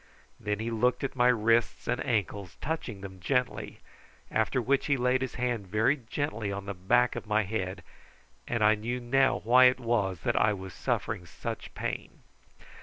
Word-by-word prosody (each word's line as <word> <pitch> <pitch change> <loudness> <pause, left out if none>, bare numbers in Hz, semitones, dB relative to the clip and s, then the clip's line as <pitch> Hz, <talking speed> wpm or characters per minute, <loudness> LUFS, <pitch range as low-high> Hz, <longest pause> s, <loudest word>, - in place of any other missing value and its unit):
Then 105 0 -2
he 115 +2 -3
looked 125 +5 +1
at 135 - -2
my 125 -1 +4
wrists 115 -1 +2
and - - 0
ankles, 100 -4 -2
touching 135 -10 -4
them 95 -1 -9
gently, 125 +7 -1 0.5
after 110 +4 +1
which 135 +4 +1
he 140 -1 +2
laid 125 +1 +2
his 130 - -3
hand 120 -5 -2
very 110 +8 +2
gently 115 -5 -3
on 100 0 -5
the 100 - -4
back 120 +7 +2
of - - -6
my 105 0 +2
head, 95 -3 -3 0.6
and 115 -2 0
I 105 +1 +6
knew 115 +4 -3
now 130 +2 +2
why 125 +3 +7
it 125 +1 +5
was 105 -8 0
that - - 0
I 105 - +3
was 95 -2 -7
suffering 90 +3 -2
such 75 - -6
pain. - - -5
115 Hz, 180 wpm, -29 LUFS, 100-125 Hz, 0.6 s, why